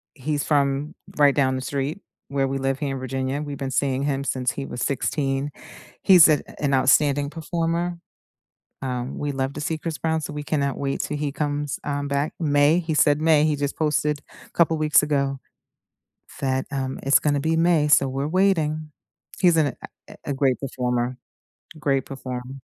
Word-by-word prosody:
He's 145 Hz, +1 st, -2 dB
from 140 Hz, 0 st, +1 dB, 0.2 s
right 145 Hz, -2 st, +5 dB
down 130 Hz, -2 st, +2 dB
the 130 Hz, -, -3 dB
street 140 Hz, +7 st, -3 dB, 0.3 s
where 140 Hz, -1 st, 0 dB
we 135 Hz, +1 st, -2 dB
live 135 Hz, 0 st, -1 dB
here 140 Hz, -3 st, -2 dB
in -, -, -5 dB
Virginia. 130 Hz, +2 st, -3 dB
We've 145 Hz, -2 st, -5 dB
been 135 Hz, -2 st, -4 dB
seeing 135 Hz, 0 st, 0 dB
him 140 Hz, -1 st, -1 dB
since 130 Hz, -3 st, -1 dB
he 140 Hz, -, -5 dB
was 120 Hz, -, -6 dB
16. 140 Hz, 0 st, -1 dB, 0.5 s
He's 180 Hz, -4 st, +8 dB
an 150 Hz, -, +3 dB, 0.2 s
an 140 Hz, -2 st, 0 dB
outstanding 140 Hz, +2 st, +3 dB
performer. 170 Hz, +2 st, -2 dB, 0.9 s
Um, 125 Hz, 0 st, -3 dB
we 145 Hz, -1 st, -2 dB
love 135 Hz, 0 st, -2 dB
to 150 Hz, -, -5 dB
see 160 Hz, +2 st, -1 dB
Chris 155 Hz, 0 st, -5 dB
Brown, 160 Hz, -1 st, -1 dB
so 150 Hz, -, -5 dB
we 150 Hz, 0 st, -5 dB
cannot 140 Hz, -2 st, -1 dB
wait 135 Hz, -1 st, -2 dB
till 150 Hz, -, -3 dB
he 145 Hz, -1 st, -2 dB
comes, 145 Hz, -1 st, -2 dB
um, 145 Hz, -1 st, -2 dB
back. 140 Hz, +2 st, -1 dB
May, 145 Hz, +1 st, +4 dB
he 160 Hz, -2 st, -2 dB
said 150 Hz, 0 st, +4 dB
May. 155 Hz, -2 st, +4 dB
He 155 Hz, -1 st, +2 dB
just 145 Hz, 0 st, -2 dB
posted 150 Hz, -1 st, 0 dB, 0.2 s
a -, -, -24 dB
couple 165 Hz, -2 st, +2 dB
weeks 150 Hz, -1 st, +4 dB
ago 140 Hz, -2 st, 0 dB, 1.0 s
that, 130 Hz, -1 st, 0 dB
um, 135 Hz, -1 st, -3 dB
it's 135 Hz, -, +5 dB
gonna 145 Hz, -1 st, +1 dB
be 160 Hz, +3 st, 0 dB
May, 165 Hz, -2 st, +3 dB
so 140 Hz, -2 st, +5 dB
we're 135 Hz, +2 st, -2 dB
waiting. 155 Hz, -4 st, +1 dB, 0.5 s
He's 175 Hz, -3 st, +5 dB
an 155 Hz, -2 st, +3 dB, 0.4 s
a -, -, -12 dB
a 140 Hz, -, -2 dB
great 135 Hz, -2 st, +1 dB
performer. 125 Hz, -2 st, -2 dB, 0.6 s
Great 135 Hz, -3 st, 0 dB
perform 130 Hz, 0 st, -7 dB
145 Hz, 180 wpm, -23 LUFS, 135-150 Hz, 1.0 s, He's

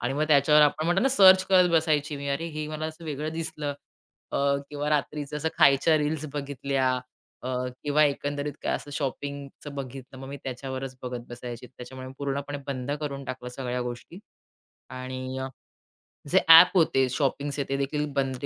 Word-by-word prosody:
आणि 120 Hz, +2 st, -1 dB
मग 150 Hz, +2 st, +1 dB
त्याच्यावर 150 Hz, +1 st, +6 dB
आपण 150 Hz, +1 st, +2 dB
म्हणतो 175 Hz, +4 st, +2 dB
ना 270 Hz, -, +4 dB
सर्च 190 Hz, -7 st, +7 dB
करत 185 Hz, -2 st, +5 dB
बसायची 155 Hz, -3 st, +1 dB
मी 140 Hz, 0 st, -5 dB
अरे, 140 Hz, +4 st, -1 dB
हे 155 Hz, -1 st, -5 dB
मला 155 Hz, 0 st, -3 dB
असं 160 Hz, +1 st, -9 dB
वेगळं 155 Hz, 0 st, -4 dB
दिसलं. 155 Hz, -3 st, -3 dB, 0.6 s
अ, -, -, 0 dB, 0.3 s
किंवा 145 Hz, 0 st, -3 dB
रात्रीचं 150 Hz, 0 st, -1 dB
असं 155 Hz, +2 st, -1 dB
खायच्या 140 Hz, +3 st, +5 dB
रील्स 150 Hz, 0 st, -1 dB
बघितल्या 140 Hz, -2 st, -1 dB, 0.6 s
अ, -, -, -2 dB, 0.4 s
किंवा 150 Hz, +1 st, +4 dB
एकंदरीत 145 Hz, 0 st, -2 dB
काय -, -, 0 dB
असं 145 Hz, -, -6 dB
शॉपिंगचं 140 Hz, +1 st, -5 dB
बघितलं 135 Hz, -1 st, -8 dB
मग 135 Hz, 0 st, -8 dB
मी 140 Hz, -, -6 dB
त्याच्यावरच 130 Hz, 0 st, -5 dB
बघत 125 Hz, -1 st, -5 dB
बसायची. 120 Hz, 0 st, -8 dB
त्याच्यामुळे 130 Hz, +1 st, -10 dB
पूर्णपणे 140 Hz, +1 st, -3 dB
बंद 135 Hz, -1 st, -4 dB
करून 140 Hz, -2 st, -4 dB
टाकलं 130 Hz, -1 st, -6 dB
सगळ्या 125 Hz, -2 st, -3 dB
गोष्टी 120 Hz, +8 st, -7 dB, 0.7 s
आणि 130 Hz, 0 st, -6 dB
अ, 130 Hz, -, -3 dB, 0.8 s
जे -, -, +5 dB
ॲप 175 Hz, +3 st, +9 dB
होते 135 Hz, -6 st, +3 dB
शॉपिंग्स 140 Hz, 0 st, -1 dB
तेदेखील 140 Hz, +2 st, -1 dB
बंद 135 Hz, -2 st, -1 dB
140 Hz, 165 wpm, -27 LUFS, 130-150 Hz, 0.8 s, ॲप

